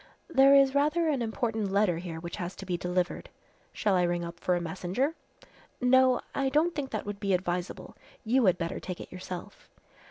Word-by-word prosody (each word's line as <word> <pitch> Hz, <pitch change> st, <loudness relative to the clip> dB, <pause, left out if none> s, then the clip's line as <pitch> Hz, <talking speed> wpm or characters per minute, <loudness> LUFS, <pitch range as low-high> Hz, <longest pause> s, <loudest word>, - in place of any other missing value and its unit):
"There 275 Hz, -3 st, +6 dB
is 275 Hz, -1 st, +5 dB
rather 300 Hz, +4 st, +2 dB
an 275 Hz, -5 st, 0 dB
important 220 Hz, -2 st, -2 dB
letter 195 Hz, -4 st, +2 dB
here 170 Hz, -2 st, -6 dB
which 170 Hz, +3 st, -7 dB
has 180 Hz, -2 st, -5 dB
to 195 Hz, -, -9 dB
be 180 Hz, -2 st, -1 dB
delivered." 180 Hz, +1 st, -2 dB, 0.4 s
"Shall 205 Hz, -, 0 dB
I 180 Hz, -, +3 dB
ring 175 Hz, 0 st, 0 dB
up 170 Hz, 0 st, -8 dB
for 180 Hz, -, +1 dB
a -, -, 0 dB
messenger?" 185 Hz, -, -2 dB, 0.7 s
"No, 255 Hz, 0 st, +4 dB
I 275 Hz, -1 st, 0 dB
don't 310 Hz, +5 st, +2 dB
think 285 Hz, -3 st, -3 dB
that 215 Hz, -, -4 dB
would 205 Hz, 0 st, -5 dB
be 195 Hz, -2 st, +1 dB
advisable. 180 Hz, 0 st, -4 dB, 0.3 s
You 240 Hz, 0 st, +3 dB
had 180 Hz, -, +4 dB
better 170 Hz, -1 st, -3 dB
take 180 Hz, -2 st, -6 dB
it -, -, -9 dB
yourself." 185 Hz, +2 st, -8 dB
200 Hz, 195 wpm, -29 LUFS, 180-260 Hz, 0.7 s, There